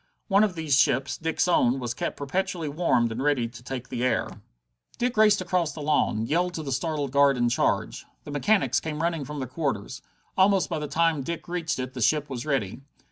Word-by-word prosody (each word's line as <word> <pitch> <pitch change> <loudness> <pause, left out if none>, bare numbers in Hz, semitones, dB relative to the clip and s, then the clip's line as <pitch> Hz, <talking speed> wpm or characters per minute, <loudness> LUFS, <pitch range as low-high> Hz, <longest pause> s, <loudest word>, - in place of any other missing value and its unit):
One 200 +1 +5
of 200 -4 0
these 155 -4 +1
ships, 130 +2 +2
Dick's 160 +2 -1
own, 135 -7 +3
was 120 -1 -3
kept - - -4
perpetually 175 +3 -2
warmed 145 -7 +1
and 115 +3 -4
ready 135 -4 +1
to 115 0 -12
take 125 0 -6
the 125 -1 -3
air. 130 - -1 0.6
Dick 245 0 -1
raced 210 -2 +5
across 180 -4 0
the 155 - -8
lawn, 115 -7 +1
yelled 175 +6 0
to 160 - -4
the 140 - -4
startled 145 0 -2
guard 140 -1 +4
in 120 -1 +2
charge. - - -1 0.2
The - - -8
mechanics 145 - +2
came 155 0 -4
running 165 -4 -1
from 150 +3 -7
their 130 -2 -3
quarters. 130 -6 -3 0.3
Almost 190 -4 +3
by 160 - -1
the 150 - -4
time 165 -1 +1
Dick 170 +6 -5
reached 170 -3 -2
it 130 0 -4
the 125 - -6
ship 145 +4 +1
was 125 +2 -5
ready. 135 -7 -1
150 Hz, 210 wpm, -26 LUFS, 130-170 Hz, 0.6 s, One